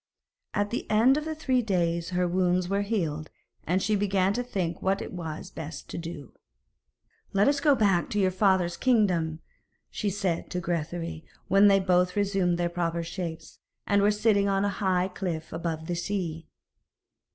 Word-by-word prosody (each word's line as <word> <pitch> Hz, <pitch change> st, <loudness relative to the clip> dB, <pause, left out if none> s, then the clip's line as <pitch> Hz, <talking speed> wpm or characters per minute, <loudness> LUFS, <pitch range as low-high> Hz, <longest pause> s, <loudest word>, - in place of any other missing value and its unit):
At 205 Hz, 0 st, 0 dB
the 240 Hz, -, -4 dB
end 230 Hz, +5 st, +5 dB
of 300 Hz, +1 st, -2 dB
the 315 Hz, 0 st, -3 dB
three 260 Hz, -5 st, +1 dB
days 170 Hz, -5 st, 0 dB
her 180 Hz, 0 st, 0 dB
wounds 180 Hz, 0 st, +1 dB
were 200 Hz, +2 st, 0 dB
healed, 165 Hz, -8 st, -2 dB, 0.4 s
and 185 Hz, +3 st, +1 dB
she 215 Hz, +2 st, +2 dB
began 195 Hz, -1 st, +1 dB
to 245 Hz, -, -1 dB
think 190 Hz, -9 st, -3 dB
what 195 Hz, +1 st, +1 dB
it -, -, -7 dB
was 170 Hz, 0 st, -6 dB
best 160 Hz, -3 st, -8 dB
to -, -, -5 dB
do. 165 Hz, -5 st, -8 dB, 1.0 s
'Let 200 Hz, +1 st, +4 dB
us 285 Hz, 0 st, +3 dB
go 285 Hz, 0 st, +4 dB
back 195 Hz, -7 st, +2 dB
to 210 Hz, -, -1 dB
your 190 Hz, -1 st, +3 dB
father's 185 Hz, -3 st, +2 dB
kingdom,' 180 Hz, -10 st, +2 dB, 0.5 s
she 210 Hz, -, -2 dB
said 185 Hz, -3 st, -2 dB
to 180 Hz, -, -2 dB
Grethari, 170 Hz, -1 st, -3 dB, 0.3 s
when 195 Hz, +2 st, +6 dB
they 200 Hz, -1 st, +6 dB
had 190 Hz, -, -2 dB
both 180 Hz, 0 st, +3 dB
resumed 195 Hz, -4 st, +1 dB
their 175 Hz, 0 st, +1 dB
proper 170 Hz, -1 st, -2 dB
shapes, 165 Hz, -1 st, -6 dB, 0.3 s
and 200 Hz, -1 st, +3 dB
were 205 Hz, -, +4 dB
sitting 210 Hz, -1 st, +2 dB
on 195 Hz, 0 st, +1 dB
a -, -, +1 dB
high 185 Hz, -2 st, 0 dB
cliff 180 Hz, -4 st, -5 dB
above 165 Hz, -1 st, -3 dB
the 175 Hz, +1 st, -2 dB
sea. 170 Hz, -3 st, -3 dB
185 Hz, 180 wpm, -27 LUFS, 170-205 Hz, 1.0 s, when